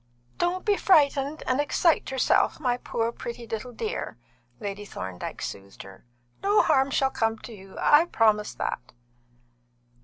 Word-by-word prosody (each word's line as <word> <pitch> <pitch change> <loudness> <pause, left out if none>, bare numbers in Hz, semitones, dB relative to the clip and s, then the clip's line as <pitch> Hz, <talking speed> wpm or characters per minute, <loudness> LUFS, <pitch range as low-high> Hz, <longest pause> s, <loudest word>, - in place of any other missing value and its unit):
"Don't 355 +1 0
be 410 -2 +3
frightened 290 -4 +3
and 255 +3 +1
excite 315 +3 +2
yourself, 265 -1 +2
my 250 -4 +1
poor, 230 -2 -2
pretty 235 0 -7
little 225 +2 -5
dear," 440 - -4 0.4
Lady 205 -2 -5
Thorndyke 95 - -6
soothed 100 0 -7
her. 95 0 -14 0.4
"No 410 +2 +4
harm 270 -4 +3
shall 270 0 +1
come 225 -2 0
to 235 - -10
you, 195 -2 -13
I 300 +3 +5
promise 215 -9 +2
that." - - -4
250 Hz, 145 wpm, -26 LUFS, 215-300 Hz, 0.4 s, I